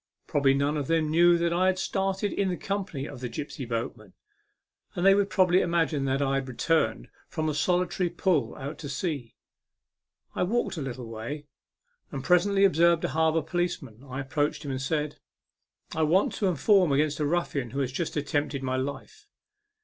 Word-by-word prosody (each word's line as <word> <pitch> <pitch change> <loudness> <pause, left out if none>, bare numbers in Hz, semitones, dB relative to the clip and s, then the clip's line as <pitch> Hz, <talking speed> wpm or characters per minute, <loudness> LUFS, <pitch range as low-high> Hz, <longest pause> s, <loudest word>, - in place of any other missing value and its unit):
Probably 140 -2 +2
none 140 +2 +1
of 145 -2 -3
them 160 -2 +1
knew 175 +2 +5
that 170 0 0
I 185 +2 +2
had 190 0 +2
started 195 +1 -1
in 190 -3 0
company 195 -9 -3
with 135 -3 -9
the 125 - -3
gipsy 140 +1 -6
boatman, 115 -4 -5 0.8
and 175 - -1
they 195 - +8
would 200 0 +2
probably 185 -2 +4
imagine 165 -4 +1
that 135 +1 +1
I 135 0 0
had 135 -1 -1
returned 155 +6 0 0.2
from 155 -2 -3
a 155 - 0
solitary 180 +4 +1
pull 160 - 0
out 140 +3 -7
to 145 - -6
sea. 140 -4 -3 1.0
I - - -3
walked 215 +3 0
a - - -3
little 130 -2 -5
way, 115 +7 -6 0.7
and - - -5
presently 195 +2 +4
observed 170 -2 +4
a - - -1
harbour 160 0 +2
police 175 +1 -1
man. 115 -1 -13
I 135 0 -5
approached 145 +2 -1
him, 140 - -3
and 130 0 -3
said 150 +1 -2 0.4
" - - -61 0.3
I 160 - 0
want 165 +6 +3
to 200 - 0
inform 180 - +3
against 150 +2 +1
a 150 - +1
ruffian 145 -6 -1
who 135 +4 -2
has 130 -2 -1
just 160 +4 -3
attempted 145 -1 -1
my 130 0 -1
life." 140 - -6
155 Hz, 190 wpm, -27 LUFS, 135-180 Hz, 1.0 s, they